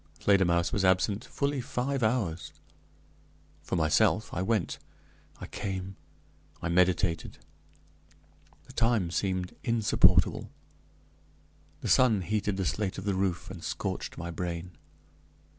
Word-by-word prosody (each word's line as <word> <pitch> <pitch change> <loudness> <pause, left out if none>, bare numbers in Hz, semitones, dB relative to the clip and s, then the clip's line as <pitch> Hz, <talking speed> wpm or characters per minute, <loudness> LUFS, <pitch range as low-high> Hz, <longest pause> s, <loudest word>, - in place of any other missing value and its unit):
Fledermausse 85 -4 +3
was 100 - +1
absent 95 +4 +2
fully 140 -1 -1
five 135 +1 -2
hours. 105 -9 0 1.1
For - - -3
myself, 80 -2 +2
I 90 - -1
went, 100 -1 0 0.6
I - - -6
came, 95 -1 -5 0.6
I 85 - -3
meditated. 90 -1 +1 1.3
The - - -14
time 115 -7 +1
seemed 90 -1 -1
insupportable. 115 -3 +3 1.3
The - - -3
sun 115 -6 +4
heated 105 +1 -1
the 95 - -1
slate 100 +1 -1
of 95 - -6
the 100 - +1
roof, 95 -1 -1
and 90 -4 -9
scorched - - -4
my 85 +1 -5
brain. 85 +1 -4
95 Hz, 115 wpm, -29 LUFS, 90-110 Hz, 1.3 s, sun